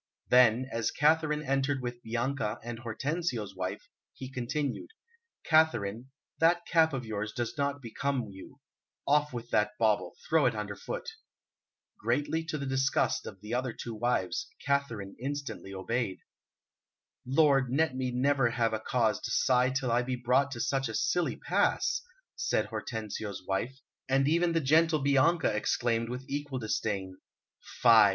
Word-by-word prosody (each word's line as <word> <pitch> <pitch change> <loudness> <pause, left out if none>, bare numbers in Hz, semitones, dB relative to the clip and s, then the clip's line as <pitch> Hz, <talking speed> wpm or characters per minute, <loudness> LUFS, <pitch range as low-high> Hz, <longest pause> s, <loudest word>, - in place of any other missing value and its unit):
Then, 125 0 +5
as 115 -1 0
Katharine 150 0 +2
entered 135 0 0
with 120 -1 -5
Bianca 120 -1 -2
and 120 0 -6
Hortensio's 120 - -3
wife, 95 0 -4 0.3
he 130 0 -8
continued: 130 +2 -3 0.5
"Katharine, 125 -7 +2 0.3
that 170 +1 +3
cap 160 -1 +4
of 130 -3 -4
yours 105 -1 -3
does 120 -2 -3
not 140 -1 -1
become 130 +2 -2
you; 95 0 -12 0.5
off 150 +1 +3
with 120 -1 -7
that 105 0 +1
bauble, 110 -2 +1
throw - - +4
it - - 0
underfoot." 485 -1 -5 0.9
Greatly 160 +3 0
to 155 -2 -3
the 140 - -4
disgust 135 0 +1
of 95 - -9
the 105 +2 -6
other 125 -1 -1
two 115 - -6
wives, 125 - -1 0.2
Katharine 120 -9 -1
instantly 140 -7 -4
obeyed. 100 +2 -2 1.1
"Lord, 135 0 +3
let 140 +1 +1
me 130 -1 -1
never 130 0 +2
have 115 -1 0
a 110 - 0
cause 110 -1 +1
to - - -4
sigh 125 -1 +3
till 130 -2 -1
I 120 +1 +3
be 125 +1 -2
brought 125 +3 +2
to 120 - -7
such 135 0 0
a 110 - -4
silly 175 - +1
pass," 475 0 +1 0.3
said - - 0
Hortensio's 110 -3 -5
wife, 120 +7 -2 0.3
and 135 +1 +3
even 170 +2 +2
the 165 - +2
gentle 155 +3 +4
Bianca 140 0 +3
exclaimed 115 +1 0
with 125 +2 -5
equal 145 -1 -3
disdain: 100 -5 -2 0.6
"Fie! 115 -4 +8
130 Hz, 150 wpm, -30 LUFS, 115-145 Hz, 1.1 s, Fie